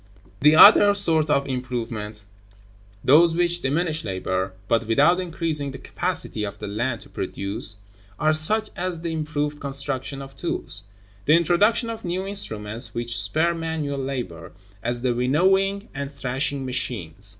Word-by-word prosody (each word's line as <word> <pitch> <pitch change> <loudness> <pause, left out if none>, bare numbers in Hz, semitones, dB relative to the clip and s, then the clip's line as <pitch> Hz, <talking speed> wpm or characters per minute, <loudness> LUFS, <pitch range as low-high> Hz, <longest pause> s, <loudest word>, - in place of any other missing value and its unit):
(2.) 95 - -26
The 150 +2 +6
other 205 +3 +9
sort 160 -6 +2
of 140 -1 +2
improvements, 115 -5 -4 0.8
those 165 +5 +6
which 175 0 +1
diminish 155 +4 0
labor, 95 -1 -2
but 115 -1 +1
without 145 +10 +4
increasing 165 -5 -2
the 135 - -7
capacity 105 - -2
of 100 0 -5
the - - -7
land 115 +4 -2
to - - -13
produce, 100 +1 -2 0.4
are 155 0 +3
such 210 +8 +1
as 180 -2 -3
the 170 -1 -3
improved 150 -1 -2
construction 140 -1 -3
of 135 0 -10
tools; 100 - -2 0.4
the 150 - +5
introduction 205 +8 +3
of 225 - -7
new 185 +1 -2
instruments 115 - -5
which 120 0 -3
spare 155 +11 +1
manual 160 -4 -3
labor, 125 - -5 0.3
as 120 +1 -2
the 125 -2 +2
winnowing 190 - +2
and 140 0 -5
thrashing 135 0 -2
machines. 105 -7 -4
140 Hz, 150 wpm, -24 LUFS, 120-170 Hz, 0.8 s, other